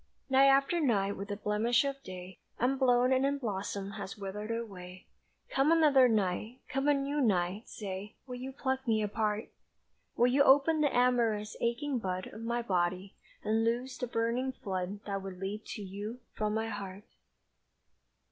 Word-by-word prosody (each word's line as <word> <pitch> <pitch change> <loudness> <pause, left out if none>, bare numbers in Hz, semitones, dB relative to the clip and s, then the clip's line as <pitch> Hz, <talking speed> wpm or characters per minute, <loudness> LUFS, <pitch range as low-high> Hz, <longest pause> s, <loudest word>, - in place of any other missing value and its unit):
Night 270 +1 +7
after 275 +5 +4
night 205 -9 +1
with 200 +2 -6
a 205 - -2
blemish 215 +5 +2
of 275 0 -3
day 185 -2 -9 0.2
Unblown 255 0 +3
and 260 +1 +3
unblossomed 205 -7 -2
has 200 +1 -6
withered 205 +2 -5
away; 190 -6 -6 0.5
Come 270 +4 +3
another 295 -6 +6
night, 215 +3 -1
come 270 +2 -1
a 290 - +6
new 280 +1 -1
night, 195 -2 +1
say 200 0 -6
Will 250 -2 -6
you 260 +2 -6
pluck 265 -1 -2
me 220 -2 +2
apart? 210 +1 -1 0.7
Will 240 - +5
you 255 +3 +4
open 285 +3 +5
the 290 - +3
amorous, 235 -4 +2
aching 250 +3 0
bud 185 -3 -3
Of 220 - -8
my 235 +1 -1
body, 185 -1 -1 0.3
and 220 +1 +1
loose 245 +3 -1
the 250 - -3
burning 235 +3 0
flood 195 -3 -4
That 195 -1 -3
would 190 -1 -7
leap 200 +3 -4
to 210 - -6
you 205 +6 -6
from 215 0 -1
my 220 0 -1
heart? 200 -2 -6
225 Hz, 165 wpm, -31 LUFS, 200-260 Hz, 0.7 s, Night